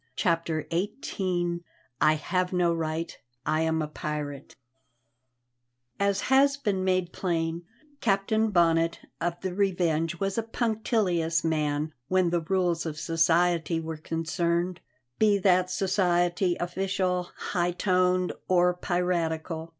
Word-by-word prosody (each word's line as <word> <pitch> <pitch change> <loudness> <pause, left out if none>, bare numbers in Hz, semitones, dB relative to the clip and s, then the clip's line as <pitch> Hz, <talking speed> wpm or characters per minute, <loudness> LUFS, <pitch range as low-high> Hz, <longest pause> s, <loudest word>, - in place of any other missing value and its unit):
CHAPTER 165 -2 0
XVIII 180 -3 -1 0.4
I 155 - +6
HAVE 180 +4 -1
NO 175 -2 +2
RIGHT; 165 0 -3 0.3
I 155 - +1
AM 160 -1 +1
A - - -3
PIRATE 150 -2 -5 1.4
As 200 -1 +1
has 275 +1 +4
been 205 -9 -1
made 185 -2 0
plain, 170 -1 -2 0.3
Captain 220 +1 +1
Bonnet 165 -3 +2 0.2
of 175 0 -1
the 185 -1 -3
Revenge 170 -4 0
was 195 +2 -1
a - - +2
punctilious 215 -8 0
man 155 -1 0
when 185 0 +2
the 175 -1 +1
rules 175 -1 0
of 155 -1 -5
society 165 0 +2
were 160 0 -5
concerned, 170 +3 -1 0.4
be 210 -2 +4
that 185 -1 +3
society 180 -1 +1
official, 180 0 -1
high 175 -2 -1
toned, 180 0 +1
or 180 -1 +4
piratical. 170 -3 -2
175 Hz, 120 wpm, -27 LUFS, 165-185 Hz, 1.4 s, I